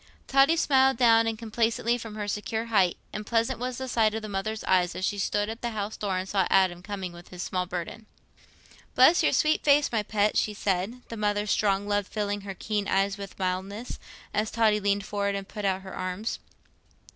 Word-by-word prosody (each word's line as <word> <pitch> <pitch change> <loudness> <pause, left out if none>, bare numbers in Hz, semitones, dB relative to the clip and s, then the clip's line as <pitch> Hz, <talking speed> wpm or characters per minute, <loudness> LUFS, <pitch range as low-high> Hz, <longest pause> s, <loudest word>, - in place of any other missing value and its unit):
Totty 275 +5 +4
smiled 265 -5 +4
down 225 -2 +4
complacently 230 +1 0
from 225 -3 -7
her 210 -1 -4
secure 220 +2 -2
height, 185 -4 +3 0.2
and 210 - -4
pleasant 230 +2 0
was 250 0 -3
the 260 - -4
sight 220 -3 +2
to 220 - -2
the 215 - -7
mother's 215 +2 -3
eyes, 180 -1 +2
as 185 - -2
she 205 - -2
stood 205 +1 0
at 225 +2 -6
the 240 - -1
house 210 +1 -3
door 195 -3 -2
and 185 +1 -3
saw 195 -2 +1
Adam 185 -2 +3
coming 190 -2 -5
with 175 0 -13
his 180 0 -6
small 180 -1 -2
burden. 180 +5 -6 0.9
"Bless 265 +7 +6
your - - +3
sweet 310 0 +2
face, 290 0 +4
my 225 -2 +1
pet," 210 0 0
she 210 - +1
said, 200 +5 -2
the 230 - -6
mother's 205 -1 0
strong 200 -1 +1
love 205 -1 0
filling 205 -1 -2
her 195 -1 -7
keen 205 +1 -2
eyes 195 +1 +1
with 200 -1 -8
mildness, 195 +5 -3 0.3
as 215 +1 0
Totty 220 -2 +2
leaned 200 -1 0
forward 200 -1 -1
and 195 -1 -5
put 210 -1 -6
out 190 -1 0
her 190 - -9
arms. 185 +5 -3
210 Hz, 205 wpm, -27 LUFS, 195-225 Hz, 0.9 s, Bless